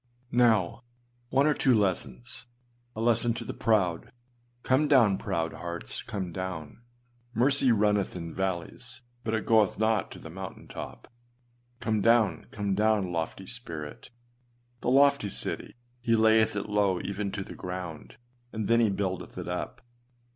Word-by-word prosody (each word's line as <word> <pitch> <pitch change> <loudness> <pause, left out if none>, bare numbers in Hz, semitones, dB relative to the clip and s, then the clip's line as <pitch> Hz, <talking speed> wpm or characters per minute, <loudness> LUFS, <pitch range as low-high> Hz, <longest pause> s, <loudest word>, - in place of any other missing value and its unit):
â 120 0 -29
Now, 115 -5 +3 0.5
one 135 +3 +3
or 150 - +4
two 130 -3 +3
lessons. 120 +5 -2 0.5
A - - -6
lesson 115 0 +4
to 115 - -5
the - - -4
proud. 95 -7 +1 0.5
Come 135 +4 +3
down, 120 -9 +5
proud 80 0 -2
hearts, 85 -8 -5
come 95 -4 -4
down! 95 0 -5 0.5
Mercy 135 +1 +4
runneth 105 -3 +2
in 85 -2 -6
valleys, 95 +7 -4 0.2
but 110 0 0
it 110 - -2
goeth 110 -4 +4
not 110 -3 +1
to - - -10
the - - -10
mountain - - -8
top. - - -8 0.7
Come 110 -2 0
down, 115 -2 +3
come 100 -2 -2
down, 105 -2 +2
lofty 85 +3 -3
spirit! 85 -10 -7 0.7
The - - -1
lofty 140 -4 +4
city, - - -4 0.3
he 115 -1 +3
layeth 110 -1 +4
it 100 - -2
low 100 -3 +2
even 100 +1 -3
to 100 - -3
the - - -9
ground, 90 -2 -7 0.3
and 110 -2 -3
then 115 0 +4
he 115 -2 +4
buildeth 95 -2 -3
it - - -5
up. - - -4
105 Hz, 155 wpm, -28 LUFS, 95-120 Hz, 0.7 s, down